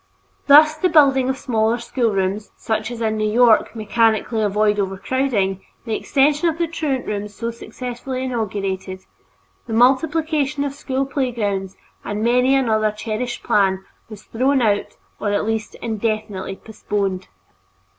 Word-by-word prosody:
Thus 305 +2 +7
the 360 +4 +1
building 270 -5 +4
of 265 - -1
smaller 225 -3 0
schoolrooms, 210 -4 -1
such 220 0 -2
as 240 -1 -7
in 220 -1 0
New 215 0 0
York 235 -1 +4
mechanically 220 0 +1
avoid 210 0 +1
overcrowding, 195 0 -1 0.2
the 225 - -3
extension 295 +7 +2
of 320 - -4
the 340 - +1
truant 300 -5 -2
rooms 205 0 -4
so 230 0 -3
successfully 250 +3 -6
inaugurated, 195 -6 -3 0.7
the 225 - -4
multiplication 290 +3 +2
of 280 -1 -3
school 270 -1 -2
playgrounds, 215 -9 -2 0.3
and 205 +1 -3
many 250 +3 +3
another 220 -5 +2
cherished 220 +3 -4
plan 190 -2 +1 0.2
was 210 -2 -11
thrown 265 +4 +1
out 205 -2 0 0.2
or 205 - -1
at 205 - 0
least 220 -1 -3
indefinitely 215 -3 -3
postponed. 200 - -3
225 Hz, 135 wpm, -20 LUFS, 210-265 Hz, 0.7 s, Thus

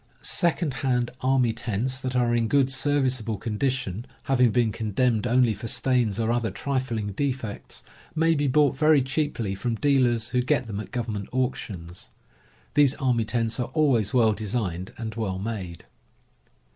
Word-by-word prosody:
Second 170 -4 +1
hand 125 -3 +1
army 130 -3 +2
tents 120 +3 -2
that 130 -1 -3
are 120 -1 +2
in 115 -1 +2
good, 135 +1 +3
serviceable 130 -5 0
condi 110 +6 -1
tion, 120 -4 -4 0.2
having 125 -2 +3
been 115 0 +2
condemned 110 +2 0
only 125 -1 +3
for 105 +3 -7
stains 120 -5 +1
or 115 0 +1
other 120 -2 0
trifling 130 -7 -2
defects, 125 -2 -4 0.3
may 165 +1 +3
be 145 -2 +1
bought 140 0 +3
very 150 -1 +4
cheaply 135 -7 -1
from 115 +4 -2
deal 135 0 +3
ers 115 -2 0
who 125 0 +1
get 125 0 +1
them 105 -2 -5
at 110 - -7
government 110 -5 -4
auctions. 100 -9 -4 0.6
These 145 -2 +4
army 125 -5 +1
tents 115 +1 -1
are 125 - -2
always 130 -10 +3
well 115 -4 +4
designed 100 -4 -3
and 110 -1 -5
well 105 -4 -2
made. 95 -5 -5
120 Hz, 160 wpm, -25 LUFS, 110-130 Hz, 0.6 s, very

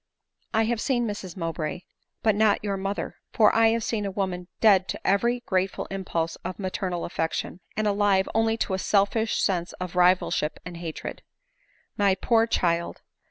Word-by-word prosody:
" - - -57
I 220 - +4
have 225 0 0
seen 245 -4 +1
Mrs 200 -4 -5
Mowbray, 165 -1 -3 0.4
but 220 - +4
not 210 0 +3
your 200 -2 -1
mother; 195 +1 -3 0.2
for 215 -2 +5
I 225 0 +6
have 225 0 +1
seen 215 -2 -1
a 200 - -2
woman 185 -2 -3
dead 195 -4 +5
to - - -5
every 235 +5 +2
grateful 190 -3 -1
impulse 170 -4 -2
of 185 +1 -6
maternal 185 -2 -3
affection, 165 +1 -3 0.2
and 215 - +1
alive 200 -2 +3
only 225 0 +2
to 190 - -4
a 190 - 0
selfish 210 +3 +1
sense 175 -2 0
of 180 -1 -6
rivalship 180 -3 +2
and 175 -1 -7
hatred. 165 -2 -6 0.8
My 200 -2 +3
poor 225 +3 +2
child 170 -5 0
195 Hz, 170 wpm, -26 LUFS, 180-215 Hz, 0.8 s, I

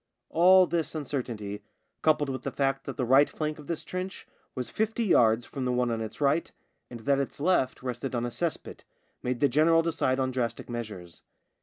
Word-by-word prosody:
All 185 +2 +7
this 170 -2 -2
uncertainty, 120 -9 -4 0.4
coupled 150 -2 +2
with 130 -2 -4
the - - -3
fact 135 -1 -1
that - - -6
the 130 - 0
right 135 +4 +5
flank 155 0 -3
of 150 - -12
this 170 -2 -3
trench 185 +1 -5 0.3
was 125 -2 -4
fifty 220 +2 0
yards 115 - +4
from 135 - -5
the 125 - 0
one 125 -1 +1
on 115 -1 -2
its 110 -1 -6
right, 145 +3 +1 0.4
and 120 -2 -9
that 140 +3 +2
its 140 +1 -3
left 145 -6 +1
rested 125 +1 -3
on 120 0 -1
a 120 - -3
cess 170 +5 -1
pit, - - -12 0.4
made 125 -1 -2
the 145 - +6
general 160 +5 +4
decide 135 -5 0
on 130 -1 0
drastic 120 -2 -3
measures. 105 -8 -7
135 Hz, 200 wpm, -28 LUFS, 120-155 Hz, 0.4 s, All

